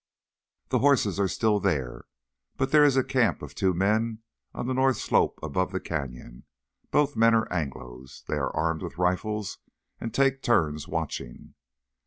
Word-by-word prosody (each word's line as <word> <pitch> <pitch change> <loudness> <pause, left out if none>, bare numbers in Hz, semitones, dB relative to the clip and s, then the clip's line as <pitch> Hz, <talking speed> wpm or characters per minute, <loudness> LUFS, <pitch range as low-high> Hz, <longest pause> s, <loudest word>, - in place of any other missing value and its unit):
"The - - +2
horses 125 -9 +3
are 100 - +3
still 105 +3 +1
there. 75 -11 -2 0.5
But 135 0 -1
there 150 -1 +6
is 140 -2 +4
a 130 - +4
camp 120 - +1
of 70 -1 -8
two 95 +4 +1
men 110 +5 0 0.3
on - - -5
the 130 - -1
north 130 -2 +2
slope - - +1
above 90 +5 -1
the 95 - -2
canyon. 65 -7 -6 0.4
Both 145 -1 +2
men 115 +1 +5
are 110 - +1
Anglos. 65 -5 -6
They - - -2
are - - -1
armed 80 -1 0
with - - -7
rifles 95 +3 -1 0.4
and 115 - -4
take 135 +2 +2
turns 80 - +1
watching." - - -5
100 Hz, 165 wpm, -27 LUFS, 80-120 Hz, 0.5 s, there